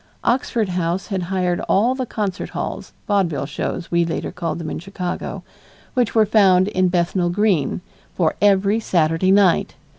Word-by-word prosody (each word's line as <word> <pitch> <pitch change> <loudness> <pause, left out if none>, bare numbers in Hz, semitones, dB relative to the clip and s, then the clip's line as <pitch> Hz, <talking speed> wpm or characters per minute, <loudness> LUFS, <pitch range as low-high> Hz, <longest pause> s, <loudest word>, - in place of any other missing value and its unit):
Oxford 235 -4 0
House 180 +1 -1
had 195 -3 -1
hired 180 -2 0
all 225 +6 +3
the 260 -1 -4
concert 200 -4 -3
halls - - -5 0.2
vaudeville 190 -9 0
shows 165 +4 -4
we 170 0 +3
later 165 -1 -3
called 165 -2 -3
them 160 -3 -5
in - - -4
Chicago 180 0 -5 0.5
which 245 -4 0
were 220 -1 +5
found 190 -3 +4
in 185 -3 +1
Bethnal 175 0 0
Green, 185 -5 +1 0.3
for 165 -4 +1
every 200 +1 +3
Saturday 165 -3 +1
night. 195 -3 +3
185 Hz, 155 wpm, -20 LUFS, 170-205 Hz, 0.5 s, were